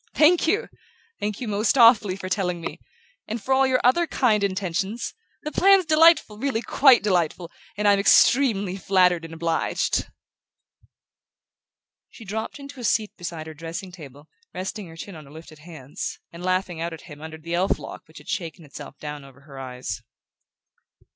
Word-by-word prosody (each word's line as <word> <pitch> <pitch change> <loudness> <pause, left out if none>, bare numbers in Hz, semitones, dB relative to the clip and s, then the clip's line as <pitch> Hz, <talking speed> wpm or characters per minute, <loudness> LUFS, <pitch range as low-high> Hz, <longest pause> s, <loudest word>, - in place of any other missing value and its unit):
"Thank 320 +2 +5
you 420 +8 +1 0.5
thank 210 -1 -3
you 245 - -5
most 210 +5 +1
awfully 230 -5 +6
for 190 -1 -7
telling 180 -3 -1
me! 165 - -6 0.5
And 225 +2 -3
for 265 +5 -1
all 265 0 +4
your 255 -1 +2
other 330 +8 +3
kind 220 -9 +2
intentions! 195 +3 -2 0.3
The 300 - -4
plan's 390 +1 +5
delightful 315 -8 +4
really 255 -3 -1
quite 265 -6 +5
delightful, 175 -3 0 0.3
and 210 0 +1
I'm 200 -1 +5
extremely 205 -3 +4
flattered 180 -3 +2
and 165 - -10
obliged." 165 0 -1 2.0
She 225 - -13
dropped 220 +6 -4
into 280 -1 -11
a - - -7
seat 215 -2 0
beside 170 -3 -6
her 160 - -8
dressing 165 +4 -7
table, 145 -4 -13 0.3
resting 190 +1 -5
her 165 0 -13
chin 200 +4 -8
on 155 -2 -11
her 140 - -16
lifted 155 0 -13
hands, 150 -4 -7 0.2
and 170 - -10
laughing 185 -2 -1
out 170 0 -3
at 160 - -10
him 145 -3 -12
under 160 0 -8
the 165 +2 -7
elf 180 +3 +1
lock - - -10
which - - -16
had - - -14
shaken 165 -2 -5
itself 145 0 -11
down 150 -1 -7
over 135 0 -16
her 135 -1 -12
eyes. 125 -5 -6
185 Hz, 175 wpm, -24 LUFS, 165-225 Hz, 2.0 s, awfully